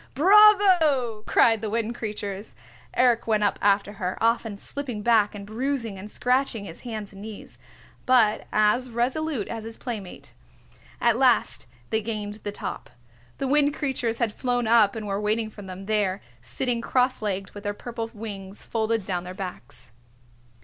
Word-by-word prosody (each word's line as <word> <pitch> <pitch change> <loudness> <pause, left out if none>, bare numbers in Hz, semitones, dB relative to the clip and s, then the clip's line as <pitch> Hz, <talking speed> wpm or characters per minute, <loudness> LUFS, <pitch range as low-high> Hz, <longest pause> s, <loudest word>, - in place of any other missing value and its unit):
"Bravo!" 355 - +5
cried 225 -2 +4
the 220 - -3
Wind 230 +1 -1
Creatures. 210 -3 -5 0.4
Eric 245 -2 +3
went 215 -2 +2
up 205 - +1
after 205 0 +2
her, 185 -2 -3
often 230 -2 +1
slipping 245 -2 -6
back 220 -2 +3
and 200 -1 -7
bruising 230 -2 -3
and 205 +3 -8
scratching 250 -3 0
his 165 -3 -9
hands 215 -4 -6
and 195 - -11
knees, 215 -1 -10 0.5
but 225 -4 +4
as 215 +4 +2
resolute 250 +1 -1
as 225 -1 -5
his 225 0 -8
playmate. 215 -7 -7 0.7
At 235 -1 +3
last 245 - +2 0.2
they 220 - +1
gained 210 -1 -4
the 205 - -4
top. - - -6 0.5
The 270 - -2
Wind 290 +1 +3
Creatures 250 -5 -1
had 230 -3 0
flown 245 -1 -1
up 220 -2 +4
and 220 -1 -5
were 200 0 -2
waiting 215 +1 0
for 210 - -11
them 190 0 -8
there, 205 -2 0 0.2
sitting 235 - -2
cross 255 +1 +1
legged 195 -2 -3
with 205 - -10
their 205 -1 -2
purple 230 0 -5
wings 205 -3 -8
folded 225 -2 -1
down 180 -2 -2
their 180 +1 -8
backs. 180 -11 -8
220 Hz, 165 wpm, -25 LUFS, 205-245 Hz, 0.7 s, Bravo